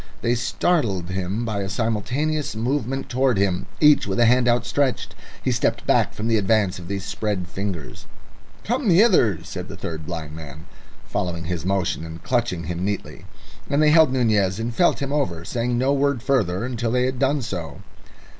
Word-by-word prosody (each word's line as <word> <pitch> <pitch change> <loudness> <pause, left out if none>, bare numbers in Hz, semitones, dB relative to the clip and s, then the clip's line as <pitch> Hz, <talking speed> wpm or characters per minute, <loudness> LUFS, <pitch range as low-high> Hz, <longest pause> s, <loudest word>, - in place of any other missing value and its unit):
They 120 - +2
startled 120 - 0
him 95 +5 -2
by 110 -3 -2
a 95 - -3
simultaneous 125 +8 -1
movement 135 +3 -2
towards 130 -4 +1
him, 95 -3 0
each 150 -6 +5
with 95 +2 -1
a 120 - +6
hand 125 +1 +4
outstretched. 125 +3 0 0.3
He - - +1
stepped - - 0
back - - +2
from 110 - -3
the 115 -1 +3
advance 100 -2 +1
of 85 - -10
these 100 0 -4
spread 100 -5 -2
fingers. 90 -7 -6 0.6
"Come 245 0 0
hither," 170 - +4
said 90 0 -6
the - - -9
third 80 -2 -6
blind 80 -4 -5
man, 75 0 -10 0.4
following 85 -2 -3
his 85 +1 -3
motion 95 -4 0
and 80 0 -9
clutching 120 -9 0
him 85 +2 -4
neatly. 100 0 -4 0.4
And 140 0 +1
they 155 0 +5
held 160 -3 +6
Nunez 110 -6 +1
and 115 +1 -3
felt 160 +1 +2
him 140 +1 -3
over, 85 - -1
saying 120 +3 -1
no 130 +3 +2
word 140 -3 +1
further 110 -8 +1
until 120 -2 -2
they 125 +2 +2
had 130 -1 -2
done 140 0 +1
so. 85 -9 -6
110 Hz, 180 wpm, -23 LUFS, 90-130 Hz, 0.6 s, a